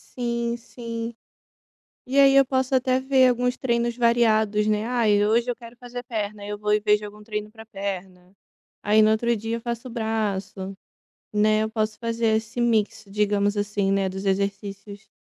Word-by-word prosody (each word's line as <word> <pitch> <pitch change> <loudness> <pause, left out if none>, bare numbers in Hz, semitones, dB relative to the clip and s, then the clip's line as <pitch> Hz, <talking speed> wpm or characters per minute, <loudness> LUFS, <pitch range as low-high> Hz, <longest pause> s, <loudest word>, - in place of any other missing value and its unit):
Sim, 235 -1 -1
sim. 230 -1 -6 0.9
E 270 +2 +3
aí 275 -1 +6
eu 275 - +7
posso 260 0 0
até 255 0 +1
ver 265 -1 +4
alguns 250 +1 +1
treinos 235 -2 0
variados, 220 -3 +3
né, 215 +1 +1
"ai, 215 -4 +2
hoje 235 +3 +2
eu 240 - -3
quero 235 -1 -13
fazer 245 0 -8
perna", 210 -3 -4
eu 210 - -4
vou 210 0 -1
e 210 - +4
vejo 210 0 +2
algum 210 0 -10
treino 210 -1 -4
para 220 0 -13
perna. 190 -3 -6 0.5
Aí 215 +1 +4
no 215 - +5
outro 235 +2 +2
dia 225 +2 -3
eu - - -6
faço 235 +2 -5
braço, 200 -4 -3 0.6
né, 215 +1 +3
eu 220 - -2
posso 215 -1 -1
fazer 230 -1 +1
esse 220 +2 -4
mix, 225 -3 +1
digamos 205 0 +1
assim, 205 -1 0
né, 195 -1 +1
dos 190 +1 -6
exercícios. 200 +1 -3
220 Hz, 175 wpm, -24 LUFS, 205-235 Hz, 0.9 s, eu